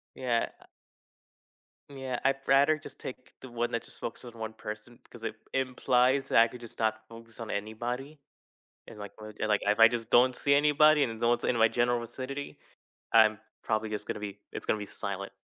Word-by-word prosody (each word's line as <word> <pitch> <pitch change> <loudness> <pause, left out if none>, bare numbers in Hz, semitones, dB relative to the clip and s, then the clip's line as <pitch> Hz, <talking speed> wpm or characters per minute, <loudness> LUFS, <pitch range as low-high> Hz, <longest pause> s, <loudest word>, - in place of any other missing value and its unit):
Yeah. 120 -3 0 1.4
Yeah, 135 -3 -4
I'd 135 0 +3
rather 140 +3 +5
just 155 - -11
take 130 0 -9
the 130 - -10
one 120 0 -1
that 115 - -1
just - - -7
focuses 120 +1 -5
on 115 - -13
one 110 0 -4
person 110 +2 -8
because 120 -1 -13
it - - -3 0.2
implies 130 +1 +2
that - - +4
I 115 - +3
could 125 +1 -11
just 115 -2 -12
not 110 -1 0
focus 115 0 -12
on 115 - -6
anybody 120 +8 -4 0.7
and, - - -11
like 100 -1 -7
like, 110 -1 -1
if 105 +1 +2
I 115 - +10
just 115 -1 -4
don't 125 +1 +5
see 140 - +2
anybody 150 +1 +5
and 115 -3 -3
no 115 - +2
one's 120 0 +1
in 120 - +1
my 115 0 +6
general 120 +1 +1
vicinity, 130 +4 -6 0.6
I'm 110 -2 +6 0.2
probably 110 0 -1
just 105 -1 -4
gonna - - -3
be, 105 -1 -6
it's - - -6
gonna - - +2
be 105 - -5
silent. 100 0 -5
120 Hz, 195 wpm, -29 LUFS, 110-130 Hz, 1.4 s, I